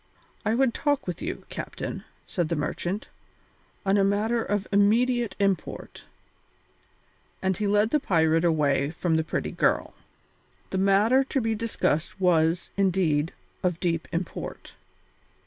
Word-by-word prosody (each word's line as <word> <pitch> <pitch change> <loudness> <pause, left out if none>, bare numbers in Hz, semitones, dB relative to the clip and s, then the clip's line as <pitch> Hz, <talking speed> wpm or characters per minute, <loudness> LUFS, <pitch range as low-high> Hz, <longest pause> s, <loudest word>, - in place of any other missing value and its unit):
"I 220 +1 +1
would 260 -1 +2
talk 290 -2 0
with 180 - -5
you, 350 +4 -5
captain," - - -6 0.2
said 175 -4 -2
the 170 - 0
merchant, 175 +6 -3 0.8
"on 195 +1 +3
a - - +4
matter 215 +4 +1
of 205 -1 -1
immediate 230 +2 +3
import." 195 -2 -2 1.3
And 190 0 0
he 210 +2 -1
led 210 +2 +3
the 300 - +3
pirate 165 - +2
away 145 -4 +2
from 165 +1 -1
the 160 - +2
pretty - - -3
girl. - - +1 0.8
The 190 - 0
matter 205 +7 +4
to 270 - -1
be 225 -2 0
discussed 210 -5 -1
was, 170 -2 +2
indeed, 175 -5 +2 0.3
of 180 -3 0
deep 165 -2 -1
import. 170 +1 -5
195 Hz, 135 wpm, -26 LUFS, 165-220 Hz, 1.3 s, a